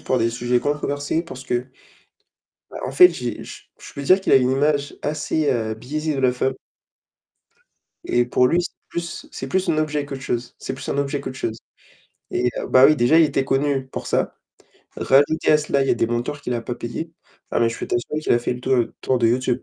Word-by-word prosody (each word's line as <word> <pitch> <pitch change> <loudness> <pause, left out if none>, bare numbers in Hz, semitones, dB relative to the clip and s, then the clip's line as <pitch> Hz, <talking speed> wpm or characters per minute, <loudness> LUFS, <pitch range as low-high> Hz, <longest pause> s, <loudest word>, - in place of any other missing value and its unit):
pour 130 - 0
des 115 +1 +1
sujets 120 +1 0
controversés 145 +1 -1
parce 130 -6 -10
que, 125 -1 -1 1.0
bah, - - -8
en 130 - -4
fait, 180 +7 +8
j'ai 125 -8 -5
je - - -10 0.2
je - - -12
peux 140 - -6
dire 185 +7 +5
qu'il 190 - +1
a - - +9
une 130 -1 +4
image 145 +1 0
assez, 150 0 -1
heu, 110 -4 -1
biaisée 150 +7 -3
de - - -2
la 130 -1 +3
femme 130 +1 0 1.5
et 120 - +2
pour 125 +1 +3
lui, 170 +6 +2
c'est 175 - -6 0.2
plus, 170 0 -5
c'est - - -6
plus 190 -1 0
un 155 - +1
objet 150 -2 0
qu'autre 135 -2 -7
chose. 120 -2 -3
C'est - - -4
plus 130 - -8
un - - -1
objet 140 0 -1
qu'autre 130 - -6
chose 110 -3 -3 0.8
et 125 0 +1
heu, - - -4
bah, 130 +1 +7
oui, 155 - +6
déjà, 140 +6 +4
il 165 - +7
était 140 -2 0
connu 135 -1 0
pour - - -6
ça. - - 0 0.6
Rajouter 145 +4 +3
à - - +7
cela, 150 -2 0
il 135 - -1
y - - +4
a - - +4
des 115 - +1
monteurs 120 +5 -3
qu'il 125 - -3
a 120 - -1
pas 120 +1 -5
payée. 120 +8 -5 0.4
Ah, - - +1
mais 115 - +4
je 115 - -7
peux - - -4
t'assurer 135 +6 -2
qu'il - - +1
a 120 - +3
fait 120 - -2
le 125 - -8
tour 125 -2 +2 0.2
tour 130 - +1
de 115 - +3
YouTube. 125 +1 0
135 Hz, 230 wpm, -22 LUFS, 125-150 Hz, 1.5 s, a